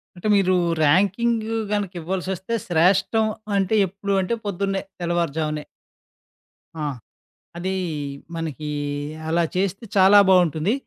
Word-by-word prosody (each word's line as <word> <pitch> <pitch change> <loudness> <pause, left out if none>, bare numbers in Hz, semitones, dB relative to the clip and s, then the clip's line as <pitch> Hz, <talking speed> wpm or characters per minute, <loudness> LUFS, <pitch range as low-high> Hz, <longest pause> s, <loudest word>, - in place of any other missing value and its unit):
అంటే, 175 +4 -5
మీరు 185 -2 +3 0.3
ర్యాంకింగ్ 205 +8 +2 0.2
గనకివ్వాల్సొస్తే 190 0 -3
శ్రేష్టం 190 +6 +3 0.3
అంటే, 195 +2 +1
ఎప్పుడు 200 +2 -4
అంటే, 185 +5 -1
పొద్దున్నే, 195 0 -1 0.2
తెల్లవారుజామనే 160 -3 -1 1.1
ఆ! 155 - -4 0.7
అదీ, 190 +2 -2 0.6
మనకి 155 -2 -4 0.6
అలా 170 +1 +2
చేస్తే, 195 +3 -1
చాలా 195 +2 +7
బావుంటుంది. 180 - +3
185 Hz, 95 wpm, -23 LUFS, 170-200 Hz, 1.1 s, చాలా